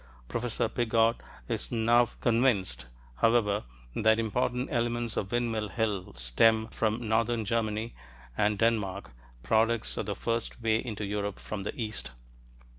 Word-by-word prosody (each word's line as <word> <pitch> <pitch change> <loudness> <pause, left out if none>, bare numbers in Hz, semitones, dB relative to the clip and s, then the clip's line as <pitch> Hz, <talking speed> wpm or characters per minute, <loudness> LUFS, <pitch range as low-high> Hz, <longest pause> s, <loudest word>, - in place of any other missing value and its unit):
Professor 120 - -1
Piggott 115 0 +2 0.3
is - - -2
now 120 +1 +4
convinced, 105 - +2 0.3
however, 110 -3 +2 0.3
that 110 0 +4
important 125 +3 0
elements 120 -1 0
of 95 - -2
Windmill 115 -3 0
Hill 105 - -2
stem 110 - +3
from 110 +1 -1
northern 115 0 +1
Germany 110 +1 -1 0.4
and 105 +5 +2
Denmark 100 -3 0 0.3
products 110 - +2
of - - -2
the - - -2
first 115 0 -2
way 110 -1 +1
into 110 -3 -4
Europe 100 0 -2
from 105 -2 -5
the 100 - -5
east. 110 -2 -3
110 Hz, 130 wpm, -29 LUFS, 105-115 Hz, 0.4 s, now